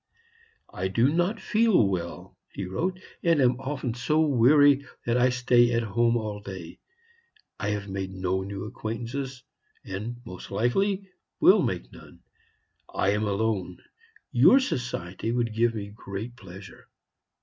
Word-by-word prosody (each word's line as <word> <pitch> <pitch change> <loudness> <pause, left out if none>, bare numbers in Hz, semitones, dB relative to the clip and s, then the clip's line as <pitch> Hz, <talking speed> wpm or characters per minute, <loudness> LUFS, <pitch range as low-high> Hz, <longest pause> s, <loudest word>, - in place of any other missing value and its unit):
"I 95 +1 -2
do 115 +9 +2
not 175 +5 +1
feel 215 - +3
well," 85 -3 -4 0.2
he 100 - -4
wrote, 180 - -2 0.2
"and 165 -3 +3
am 125 -2 +3
often 135 -3 -3
so 125 +6 0
weary 145 0 +5 0.2
that 115 - +1
I 125 +1 +4
stay 120 -1 +3
at 115 - +1
home 115 +2 +2
all 105 -2 -4
day. 95 -4 -9 0.8
I 100 - -1
have 105 -1 -3
made 95 -1 -4
no 95 0 -1
new 100 0 -5
acquaintances, 120 +4 -5 0.4
and, 105 +5 -5
most 90 - -9
likely, 190 - 0 0.3
will - - +6
make - - -3
none. - - -15 0.7
I 95 - +1
am 105 +2 +1
alone. 100 -3 -1 0.5
Your 270 - +6
society 120 - -3
would 120 -2 0
give 115 +1 +2
me 100 -2 -5
great 105 +3 -7
pleasure. 95 -4 -12
115 Hz, 140 wpm, -26 LUFS, 100-130 Hz, 0.8 s, will